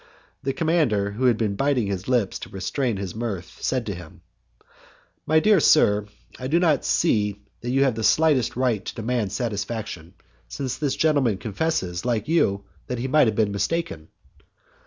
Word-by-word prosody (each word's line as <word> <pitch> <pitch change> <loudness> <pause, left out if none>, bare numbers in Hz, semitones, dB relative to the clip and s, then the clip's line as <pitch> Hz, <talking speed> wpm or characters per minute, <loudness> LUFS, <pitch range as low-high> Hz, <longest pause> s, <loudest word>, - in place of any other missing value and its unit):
The 135 - -1
commander, 135 -10 +1
who 120 +6 -2
was 125 -2 +5
biting 115 +4 0
his 100 -1 -4
lips 120 -6 +1
to - - -8
restrain 110 +4 -2
his 95 -2 -5
mirth, 100 -6 -5
said 130 -3 -1
to 100 - -3
him, 85 -3 -11 1.1
"My 155 +1 +5
dear 210 +2 +4
sir, 105 -10 +4 0.3
I 130 - -4
do 165 +5 +2
not 160 -6 +2
see 105 -2 +1 0.2
that 120 - -5
you 135 +2 +3
have 135 -3 +2
the 110 0 -4
slightest 150 -2 +3
right 120 -5 0
to - - -6
demand 115 -3 -1
satisfaction, 105 -6 -4 0.3
since 130 -3 -4
this 145 -3 0
gentleman 140 -10 +2
confesses, 100 - -2
like 115 -3 -1
you, 100 -12 +2 0.2
that 125 - -3
he 125 +3 -2
might 150 -1 +4
have 110 - 0
been 105 -2 +1
mistaken." 100 - -2
115 Hz, 170 wpm, -24 LUFS, 100-135 Hz, 1.1 s, was